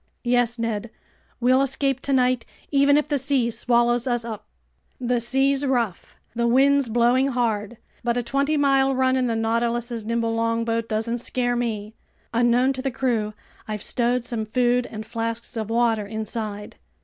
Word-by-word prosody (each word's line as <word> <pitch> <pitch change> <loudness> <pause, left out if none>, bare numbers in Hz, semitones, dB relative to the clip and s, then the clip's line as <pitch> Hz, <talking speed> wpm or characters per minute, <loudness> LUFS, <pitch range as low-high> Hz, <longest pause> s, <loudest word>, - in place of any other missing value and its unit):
"Yes, 245 -1 +1
Ned! 230 -1 -2 0.5
We'll 255 +2 +4
escape 275 0 0
tonight 255 -3 +1 0.3
even 285 0 +4
if 300 - +1
the 290 -2 0
sea 260 -3 +1
swallows 240 +1 +2
us 240 -2 0
up!" 220 -3 -7 0.5
"The 245 -1 0
sea's 270 +3 +1
rough, 240 -8 -1 0.2
the 235 0 0
wind's 270 +1 +4
blowing 240 +3 +3
hard, 235 -4 -1 0.3
but 240 0 0
a 245 - 0
twenty 280 +5 0
mile 270 -1 +3
run 260 0 +2
in 255 -1 +1
the 230 - 0
Nautilus's 230 +1 -1
nimble 230 +1 -1
longboat 230 0 -1
doesn't 225 +2 -1
scare 245 0 -1
me. 220 -3 -3 0.4
Unknown 240 +3 +3
to 260 - -5
the 270 - -1
crew, 230 -5 -1 0.3
I've 215 -1 -4
stowed 245 0 0
some 235 -3 -2
food 245 +2 +1
and 215 0 -7
flasks 230 +1 -4
of 220 -1 -3
water 225 -3 +1
inside." 215 -1 -4
240 Hz, 160 wpm, -23 LUFS, 230-260 Hz, 0.5 s, We'll